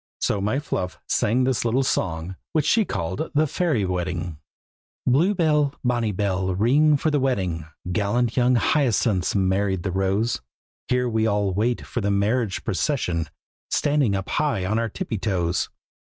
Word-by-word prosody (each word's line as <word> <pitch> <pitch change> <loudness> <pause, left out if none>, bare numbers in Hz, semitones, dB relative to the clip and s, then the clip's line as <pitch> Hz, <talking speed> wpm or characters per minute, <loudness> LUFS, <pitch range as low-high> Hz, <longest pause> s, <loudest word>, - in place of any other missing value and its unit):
So 100 - 0
my 105 +7 0
Fluff 90 - -3
sang 120 +5 +2
this 130 -2 +1
little 120 +3 +2
song, 85 -6 -1 0.2
which 155 -2 +2
she 220 +7 +3
called 95 - -3
"The 155 +2 +4
Fairy 150 - 0
Wedding:" 90 -3 -3 0.7
Blue 165 +11 +3
bell, 150 -5 +2
bonny 120 -3 +1
bell, 95 -1 -1
ring 145 +9 +4
for 155 +3 0
the 145 - +2
wedding! 95 - -1 0.2
Gallant 110 +5 0
young 125 0 +3
Hyacinth's 115 - +2
married 95 -1 +1
the 95 - -2
rose; 95 +5 0 0.5
Here 125 0 +1
we 110 -1 +1
all 100 -2 +1
wait 115 +5 0
for 120 - -3
the 100 - 0
marriage 100 +1 0
procession, 90 - -1 0.4
Standing 145 -8 +2
up 95 0 -3
high 145 -11 0
on 110 +4 0
our 115 -1 -1
tippy 130 - -4
toe 95 -2 0
toes. 85 +2 -1
110 Hz, 160 wpm, -24 LUFS, 95-130 Hz, 0.7 s, The